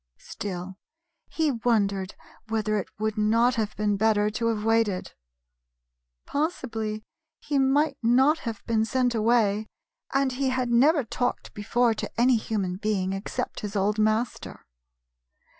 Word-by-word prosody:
Still, 190 -1 -7 0.5
he 315 -2 +1
wondered 205 -5 0 0.3
whether 215 -1 0
it 190 - -6
would 215 0 -2
not 230 +4 +3
have 220 -3 -2
been 210 -1 0
better 210 0 +2
to 230 +2 -1
have 220 -2 -1
waited. 225 -4 +1 1.1
Possibly 225 -8 -3 0.4
he 285 -1 -1
might 280 +3 +2
not 265 +7 +4
have 225 -4 -6
been 225 -2 +1
sent 245 +2 +1
away, 220 -2 +2 0.4
and 275 -1 +1
he 265 +1 -1
had 255 -1 -1
never 280 +5 +4
talked 245 +2 -3
before 230 +3 +1
to 220 - -5
any 245 0 +5
human 200 -5 -2
being 195 -2 -1
except 195 +1 -4
his 210 0 -6
old 205 +2 +1
master. 215 +2 -1
225 Hz, 135 wpm, -26 LUFS, 210-245 Hz, 1.1 s, any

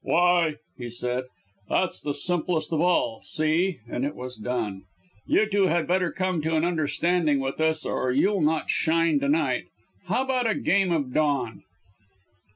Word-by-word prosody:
"Why!" 175 -2 +3 0.2
he 120 -1 -5
said, 125 +2 -2 0.4
"that's 185 - 0
the 145 -1 -3
simplest 170 0 0
of 155 - +1
all! 175 -10 +1
See!" 155 - 0
And 125 - -3
it 145 +2 -2
was 125 0 -7
done. 110 -4 -4 0.4
"You 215 - +3
two 200 -2 +2
had 170 -1 +1
better 180 0 +1
come 185 -3 -1
to 160 +2 -1
an 155 +1 +2
understanding 160 -1 +1
with 135 +3 -3
us 160 0 +1
or 130 - -1
you'll 190 +9 +2
not 155 +1 +1
shine 165 - +2
to 280 0 -1
night. 305 +3 +1 0.4
How 260 - +1
about 255 -3 0
a 215 - +1
game 195 -2 +2
of 145 -6 -1
Don?" 140 -7 0
160 Hz, 165 wpm, -25 LUFS, 135-180 Hz, 0.4 s, Why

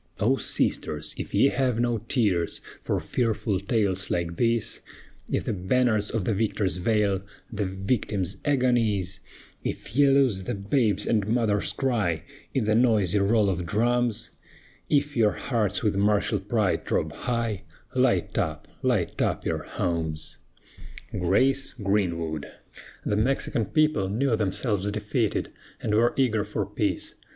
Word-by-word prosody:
O 120 +6 +3
sisters, 75 - -1
if - - -6
ye 140 - +4
have 130 -5 0
no 120 -1 +1
tears 105 -6 0 0.2
For - - -1
fearful 110 -4 -1
tales 100 -2 0
like 85 -1 -1
these, 115 -2 +1 0.5
If - - 0
the - - -2
banners 105 +2 +1
of 110 -5 -2
the 110 - +1
victors 100 -2 0
veil 100 0 +1 0.3
The 105 -1 -1
victim's 95 -1 -1
agonies, 115 -9 +1 0.4
If 110 - -5
ye 145 +1 +6
lose 130 -9 +3
the - - -2
babe's 105 0 +1
and 105 -3 +1
mother's 110 -3 +1
cry 110 - 0 0.3
In 130 - 0
the 105 0 +2
noisy 110 -5 +3
roll 105 +1 +3
of 90 -3 -1
drums, 120 +3 +1 0.6
If 145 0 +1
your 110 -3 +3
hearts 110 -5 -1
with 105 -3 +1
martial 105 +1 +2
pride 100 0 0
throb - - 0
high, 115 -5 -2 0.3
Light - - +2
up, - - -2
light - - 0
up - - 0
your - - -1
homes! 80 -3 -3 0.7
GRACE 135 +10 +2
GREENWOOD. 85 - -1 0.6
The 105 - +1
Mexican 120 -1 +1
people 155 -11 +2
knew 120 +4 +1
themselves 105 -1 0
defeated, 105 +2 -1 0.3
and 105 - -2
were 115 +3 +3
eager 115 -6 +2
for 105 - -3
peace. - - -2
105 Hz, 140 wpm, -26 LUFS, 95-120 Hz, 0.7 s, ye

